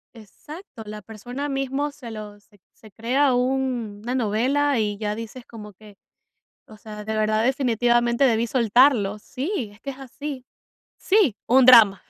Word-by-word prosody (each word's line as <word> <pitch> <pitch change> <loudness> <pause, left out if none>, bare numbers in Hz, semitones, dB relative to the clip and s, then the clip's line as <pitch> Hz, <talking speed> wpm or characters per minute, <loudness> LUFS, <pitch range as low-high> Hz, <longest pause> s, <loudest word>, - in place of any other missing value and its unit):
Exacto, 240 - -12
la 210 0 -8
persona 245 +7 -7
mismo 275 +1 -2
se 250 -5 -11
lo 210 -1 -8
se 205 0 -27
se 215 - -18
crea 255 +6 +1
un 250 -4 -1
una 245 - -3
novela, 260 +5 +1
y 210 -2 -1
ya 210 0 -3
dices 230 +2 -9
como 210 -2 -11
que: 205 +1 -17 0.7
"O 215 -1 -15
sea, 210 -1 -9
de 220 +1 -3
verdad 215 +1 +1
definitivamente 240 -1 +1
debí 230 -2 +2
soltarlo", 230 -3 +3
sí, 260 - -4
es 205 - -20
que 275 - -6
es 265 - -10
así 270 0 -8 0.5
Sí, 380 - +2
un 260 +1 +5
drama, 225 -6 +7
235 Hz, 160 wpm, -23 LUFS, 215-265 Hz, 0.7 s, drama